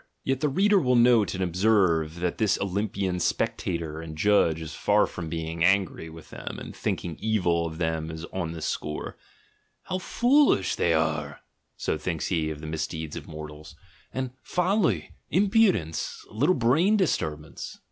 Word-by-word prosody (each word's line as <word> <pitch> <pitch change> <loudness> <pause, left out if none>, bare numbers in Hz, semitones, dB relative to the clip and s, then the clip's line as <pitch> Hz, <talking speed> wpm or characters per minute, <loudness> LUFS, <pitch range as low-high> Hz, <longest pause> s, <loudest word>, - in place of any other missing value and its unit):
Yet 135 -1 0
the 150 +1 +1
reader 200 +7 +4
will 125 -6 +2
note 120 -4 +4
and 95 - -1
observe 90 -4 +2
that 90 -1 -1
this 105 -3 +3
Olympian 100 -2 -1
spectator 80 -2 -1
and 80 -1 -8
judge 85 -3 +3
is 80 -2 -7
far - - +3
from 85 -3 -6
being 80 0 -3
angry 95 -3 +2
with 80 0 -13
them - - -7
and - - -8
thinking 85 -3 -3
evil 90 -7 +1
of 80 -1 -7
them 80 -1 -1 0.2
on 85 -4 -2
this 80 -2 -5
score. 75 0 -4 0.7
"How 185 0 -3
joolisJi 245 - +3
they 85 - +2
are," 75 -2 -1 0.4
so 75 - -1
thinks 80 -1 -2
he 80 -4 0
of 75 -1 -6
the - - -7
misdeeds 80 0 -4
of - - -7
mortals 75 0 -9 0.2
— 85 - -30
and 130 -1 -3
"folly," 185 +1 +1 0.2
"imprudence," 190 - +2
"a - - -15
little 145 +12 +3
brain 155 - +3
disturbance." 80 - -2
90 Hz, 160 wpm, -26 LUFS, 80-120 Hz, 0.7 s, reader